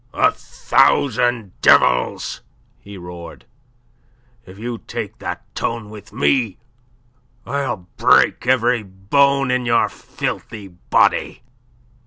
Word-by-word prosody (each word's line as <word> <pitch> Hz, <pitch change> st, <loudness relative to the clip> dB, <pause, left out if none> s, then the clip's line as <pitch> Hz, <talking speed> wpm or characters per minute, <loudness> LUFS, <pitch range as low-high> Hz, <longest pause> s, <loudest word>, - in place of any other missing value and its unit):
"A -, -, +4 dB
thousand 120 Hz, -5 st, +1 dB
devils!" -, -, +3 dB, 0.4 s
he 100 Hz, 0 st, -12 dB
roared; 85 Hz, -2 st, -10 dB, 1.0 s
"if 95 Hz, +1 st, -13 dB
you 115 Hz, +1 st, -5 dB
take -, -, -7 dB
that -, -, -5 dB
tone 115 Hz, -3 st, -4 dB
with 105 Hz, -2 st, -12 dB
me, 115 Hz, -8 st, +1 dB, 0.9 s
I'll 125 Hz, -10 st, -3 dB
break -, -, +3 dB
every 125 Hz, -2 st, +2 dB
bone 130 Hz, +8 st, +1 dB
in 125 Hz, -1 st, 0 dB
your 115 Hz, 0 st, +3 dB
filthy 100 Hz, -3 st, -6 dB
body." 90 Hz, +6 st, 0 dB
115 Hz, 100 wpm, -19 LUFS, 95-125 Hz, 1.0 s, A